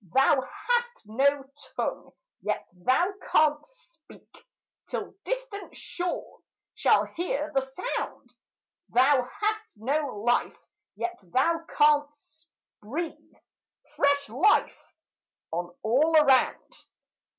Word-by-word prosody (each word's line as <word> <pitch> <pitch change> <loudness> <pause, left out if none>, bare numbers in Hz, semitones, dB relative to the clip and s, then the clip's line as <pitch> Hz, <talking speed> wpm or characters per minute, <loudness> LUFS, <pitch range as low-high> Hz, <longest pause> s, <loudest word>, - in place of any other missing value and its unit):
Thou 270 +1 +5
hast 480 - -2
no 275 +6 +2 0.3
tongue, - - -3 0.3
yet - - -2
thou 260 - +1 0.2
canst 300 +6 +3 0.3
speak, - - -18 0.5
Till - - -4
distant - - -5
shores 355 0 -5 0.2
shall - - +3
hear 305 -3 -3
the 270 - +3
sound; 265 - -5 0.6
Thou 260 +2 +4 0.2
hast 430 +1 -1
no 265 -1 -2
life, 240 +1 +1 0.4
yet 355 0 -4
thou 330 - +2
canst 295 +1 +1 0.3
breathe 315 +10 -3 0.8
Fresh 285 -2 +2
life 300 - +1 0.6
on 175 +1 -3
all 295 +9 +4
around. 275 -4 +3
290 Hz, 95 wpm, -27 LUFS, 260-345 Hz, 0.8 s, Thou